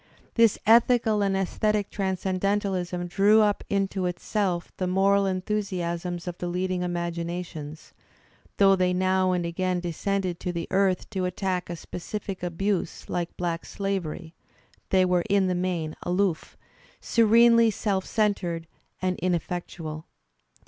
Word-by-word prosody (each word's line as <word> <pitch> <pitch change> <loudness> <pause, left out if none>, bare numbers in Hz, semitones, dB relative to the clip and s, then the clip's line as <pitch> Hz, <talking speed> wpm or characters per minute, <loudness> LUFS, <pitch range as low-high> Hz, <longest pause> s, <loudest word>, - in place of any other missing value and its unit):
This 230 -3 +4
ethical 225 -1 +4
and 195 -1 +1
aesthetic 205 +2 0
transcendentalism 190 -1 -1
drew 200 +5 +4
up 205 -1 +1
into 195 -2 0
itself 180 0 -2
the 185 - -1
moral 195 +2 +3
enthusiasms 180 -3 -2
of 175 0 -5
the 175 - -3
leading 180 +1 -1
imaginations; 170 -3 -4 0.6
though 195 -1 +6
they 180 -1 +1
now 185 0 +2
and 180 -1 0
again 180 +1 -1
descended 180 +1 -2
to 180 - -3
the 170 -1 -4
earth 190 -1 +2
to 190 -3 -1
attack 180 0 -2
a 175 - -3
specific 190 +4 -6
abuse 180 +1 -2
like 175 -1 -3
black 170 -2 -2
slavery 180 -4 -4 0.6
they 185 -1 +4
were 180 -1 +2
in 200 -1 +3
the 185 - +1
main 175 -3 -2
aloof, 180 -2 -1 0.4
serenely 230 0 +5
self 200 -2 -1
centred 185 -7 -1 0.4
and 185 -1 0
ineffectual. 170 -3 -3
185 Hz, 130 wpm, -26 LUFS, 175-200 Hz, 0.6 s, though